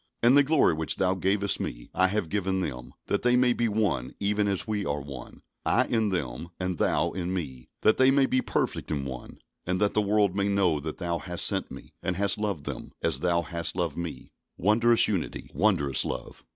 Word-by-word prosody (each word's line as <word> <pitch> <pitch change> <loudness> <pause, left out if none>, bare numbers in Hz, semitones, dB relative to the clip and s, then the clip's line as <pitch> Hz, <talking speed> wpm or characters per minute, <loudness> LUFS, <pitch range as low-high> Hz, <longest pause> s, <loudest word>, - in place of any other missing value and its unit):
"And 120 +3 +6
the 145 - +8
glory 145 - +3
which 80 0 -1
Thou 95 0 +1
gavest 95 +2 0
Me - - -6
I 95 - +4
have 100 -2 -1
given 95 -1 0
them; 60 -8 -5
that - - 0
they 125 0 +3
may 125 -1 +4
be 120 -1 0
one, 100 - -1
even 105 +1 +1
as 100 0 0
We 105 -2 -1
are 75 -5 -2
one; 70 -3 -10 0.2
I - - +3
in 110 -3 +1
them, 80 -4 -3
and 90 -2 -2
Thou - - +2
in 90 -1 -3
Me, 65 -8 -6
that 110 - +4
they 130 0 +5
may 135 0 +4
be 130 -1 +1
perfect - - -2
in 70 -3 -2
one; 65 -2 -7 0.3
and 90 +1 0
that 105 0 +2
the 105 - +3
world 100 -2 +2
may 100 0 +1
know 95 -6 +2
that 75 +2 -6
Thou 85 -2 -2
hast 90 -2 -2
sent - - 0
Me, - - -11
and 90 - -1
hast 100 +2 +1
loved 100 -8 -2
them, - - -7
as - - +1
Thou 85 -1 +1
hast 85 -1 -3
loved 85 -5 -1
Me." 85 -7 -6 0.3
Wondrous 115 +5 +4
unity! 95 -6 -3
Wondrous 70 -1 +2
love! - - -6
95 Hz, 215 wpm, -27 LUFS, 80-105 Hz, 0.3 s, the